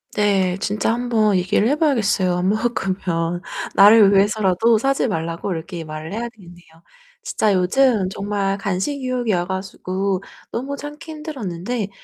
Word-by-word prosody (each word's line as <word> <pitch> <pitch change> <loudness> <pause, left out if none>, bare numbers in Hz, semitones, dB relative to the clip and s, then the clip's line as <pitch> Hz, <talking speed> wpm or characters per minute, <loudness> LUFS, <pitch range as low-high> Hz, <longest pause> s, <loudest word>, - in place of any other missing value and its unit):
네. 195 -3 +2
진짜 210 +2 0
한번 230 -4 +1
얘기를 185 +4 +2
해 285 - +2
봐야겠어요 215 - +1
안 180 +1 +1
먹으면. 185 -6 -1 0.3
나를 205 0 +7
위해서라도 205 +2 +3
사지 270 +3 +1
말라고 165 -1 -3
이렇게 165 0 -5
말을 155 +2 -7
해야 235 +2 -3
되겠네요. 175 -6 -16 0.6
진짜 220 - +1
요즘 200 +3 +2
정말 195 0 -2
간식 200 +9 -2
유혹이 250 -4 -1
와 175 0 0
가지고 190 0 -3 0.3
너무 275 +4 -4
참기 295 +3 -8
힘들었는데 240 - -4
200 Hz, 325 characters per minute, -21 LUFS, 185-235 Hz, 0.6 s, 나를